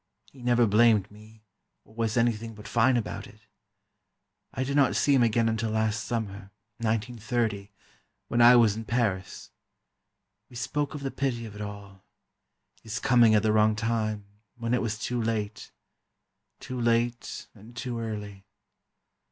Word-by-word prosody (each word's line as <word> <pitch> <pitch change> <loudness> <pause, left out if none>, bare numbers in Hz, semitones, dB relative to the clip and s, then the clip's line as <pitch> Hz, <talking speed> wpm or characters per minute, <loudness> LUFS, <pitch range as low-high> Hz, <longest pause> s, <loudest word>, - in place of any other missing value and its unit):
He 135 - -16
never 120 -1 +3
blamed 105 -1 +4
me, 110 +1 -17 0.4
or - - -20
was 115 0 -1
anything 115 -1 0
but 105 0 -11
fine 120 +2 +3
about 115 - -4
it. - - -18 1.1
I 130 - -2
did 140 +2 -2
not 140 -2 +3
see 145 - +3
him 135 - +4
again 115 0 +2
until 115 0 -1
last 110 -1 -1
Summer 100 -4 -4 0.3
(1930), 115 -2 -2 0.6
when 120 +1 +1
I 120 +1 +9
was 115 -4 +5
in 110 - -5
Paris. 105 -6 -2 1.0
We 125 - -15
spoke 140 +4 -2
of 145 - -6
the 135 - -2
pity 125 -4 -2
of 110 - -9
it 105 - -9
all—his 100 +2 -11
coming 120 -4 +5
at 105 - +3
the 110 - +3
wrong 110 0 +4
time, 110 -2 -2 0.3
when 115 0 -2
it 125 - +2
was 110 -2 -2
too 120 +1 -2
late—too 110 +3 -7
late 120 0 0
and 110 +3 -15
too 125 -2 -4
early. 105 -3 -6
115 Hz, 150 wpm, -27 LUFS, 105-120 Hz, 1.1 s, I